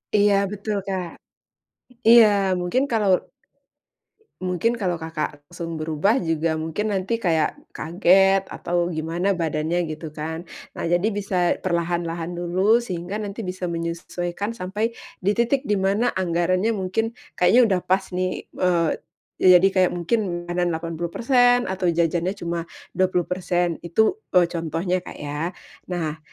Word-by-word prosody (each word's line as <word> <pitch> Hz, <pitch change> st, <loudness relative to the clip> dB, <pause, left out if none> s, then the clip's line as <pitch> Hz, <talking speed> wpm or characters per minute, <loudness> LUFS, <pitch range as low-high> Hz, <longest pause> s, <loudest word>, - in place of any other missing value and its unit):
Iya, 205 Hz, 0 st, +5 dB, 0.2 s
betul, 210 Hz, +1 st, -3 dB
Kak. 185 Hz, -3 st, -2 dB, 1.0 s
Iya, 235 Hz, -1 st, +9 dB, 0.3 s
mungkin 210 Hz, +10 st, +1 dB
kalau 210 Hz, -4 st, +2 dB, 1.4 s
mungkin 180 Hz, +6 st, +1 dB
kalau, 180 Hz, -3 st, 0 dB
Kakak, 160 Hz, -1 st, -2 dB, 0.2 s
langsung 170 Hz, -1 st, -6 dB
berubah 160 Hz, +7 st, +1 dB
juga 165 Hz, 0 st, +1 dB
mungkin 160 Hz, +7 st, -2 dB
nanti 190 Hz, +3 st, -2 dB
kayak 160 Hz, -3 st, +3 dB, 0.3 s
kaget 190 Hz, +3 st, +4 dB
atau 175 Hz, 0 st, -3 dB, 0.2 s
gimana 165 Hz, +4 st, -1 dB
badannya 160 Hz, +2 st, 0 dB
gitu 155 Hz, +1 st, -6 dB
kan. 160 Hz, +1 st, -3 dB, 0.4 s
Nah, -, -, -4 dB
jadi 175 Hz, +4 st, +2 dB
bisa 195 Hz, -2 st, -3 dB, 0.3 s
perlahan-lahan 170 Hz, -1 st, -1 dB
dulu, 175 Hz, +1 st, -2 dB, 0.2 s
sehingga 180 Hz, 0 st, -4 dB
nanti 200 Hz, +3 st, -6 dB
bisa 185 Hz, 0 st, -6 dB
menyesuaikan 175 Hz, +4 st, -3 dB
sampai 195 Hz, +4 st, -2 dB, 0.4 s
di 200 Hz, -, +4 dB
titik 240 Hz, +3 st, +2 dB
di 210 Hz, -1 st, +1 dB
mana 205 Hz, +5 st, +2 dB, 0.2 s
anggarannya 185 Hz, +3 st, +1 dB
mungkin 190 Hz, +4 st, 0 dB, 0.3 s
kayaknya 230 Hz, +8 st, +5 dB
udah 190 Hz, -3 st, +1 dB
pas 190 Hz, +1 st, +3 dB
nih, 185 Hz, 0 st, +1 dB, 0.3 s
eee, 175 Hz, -3 st, +3 dB, 0.5 s
ya, -, -, +3 dB
jadi 190 Hz, +2 st, +5 dB
kayak 185 Hz, -1 st, +4 dB
mungkin 175 Hz, +7 st, 0 dB, 0.3 s
makanan 175 Hz, 0 st, -1 dB
80% 235 Hz, -, +2 dB
atau 190 Hz, -1 st, -1 dB
jajannya 170 Hz, +3 st, +1 dB
cuma 170 Hz, 0 st, -2 dB, 0.3 s
20%. 180 Hz, -1 st, 0 dB
Itu, 220 Hz, -, +2 dB, 0.2 s
eee, 180 Hz, -1 st, +6 dB
contohnya, 170 Hz, +2 st, -1 dB
Kak, -, -, -8 dB
ya. 150 Hz, +5 st, -3 dB, 0.3 s
Nah, 160 Hz, -3 st, -3 dB
180 Hz, 130 wpm, -23 LUFS, 170-195 Hz, 1.4 s, Iya